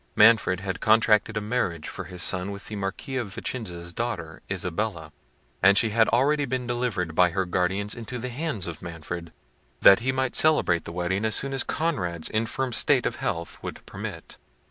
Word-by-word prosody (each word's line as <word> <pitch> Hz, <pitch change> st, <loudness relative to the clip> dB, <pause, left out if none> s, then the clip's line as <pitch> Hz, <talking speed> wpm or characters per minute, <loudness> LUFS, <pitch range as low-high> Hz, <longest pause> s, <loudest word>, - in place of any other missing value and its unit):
Manfred 105 Hz, -4 st, +5 dB
had 95 Hz, -1 st, -4 dB
contracted 110 Hz, 0 st, +3 dB
a -, -, 0 dB
marriage 105 Hz, -8 st, -2 dB
for -, -, -6 dB
his 90 Hz, 0 st, -3 dB
son 90 Hz, +1 st, +1 dB
with 100 Hz, 0 st, -7 dB
the 110 Hz, -, -5 dB
Marquis 100 Hz, +7 st, -4 dB
of 105 Hz, -6 st, -4 dB
Vicenza's 85 Hz, -8 st, -5 dB
daughter, 85 Hz, -8 st, -4 dB
Isabella; 90 Hz, -3 st, -2 dB, 0.5 s
and 100 Hz, +1 st, +6 dB
she 115 Hz, 0 st, +3 dB
had 115 Hz, +1 st, +4 dB
already 145 Hz, +5 st, +2 dB
been 130 Hz, -1 st, -2 dB
delivered 120 Hz, -9 st, -2 dB
by 90 Hz, +2 st, +4 dB
her 95 Hz, +2 st, -1 dB
guardians 95 Hz, +3 st, 0 dB
into 120 Hz, +2 st, -6 dB
the 125 Hz, +2 st, -4 dB
hands 130 Hz, -, -3 dB
of 85 Hz, -2 st, -7 dB
Manfred, 85 Hz, 0 st, -7 dB, 0.5 s
that 100 Hz, -, +8 dB
he 130 Hz, +3 st, 0 dB
might 130 Hz, -1 st, -1 dB
celebrate 90 Hz, -, +4 dB
the -, -, -6 dB
wedding 90 Hz, +4 st, -1 dB
as 110 Hz, -1 st, +3 dB
soon 135 Hz, 0 st, 0 dB
as 135 Hz, -, +3 dB
Conrad's 90 Hz, -, -2 dB
infirm 115 Hz, +4 st, -1 dB
state -, -, +3 dB
of -, -, -1 dB
health 85 Hz, 0 st, -4 dB
would -, -, -7 dB
permit. -, -, -8 dB
100 Hz, 185 wpm, -26 LUFS, 90-120 Hz, 0.5 s, that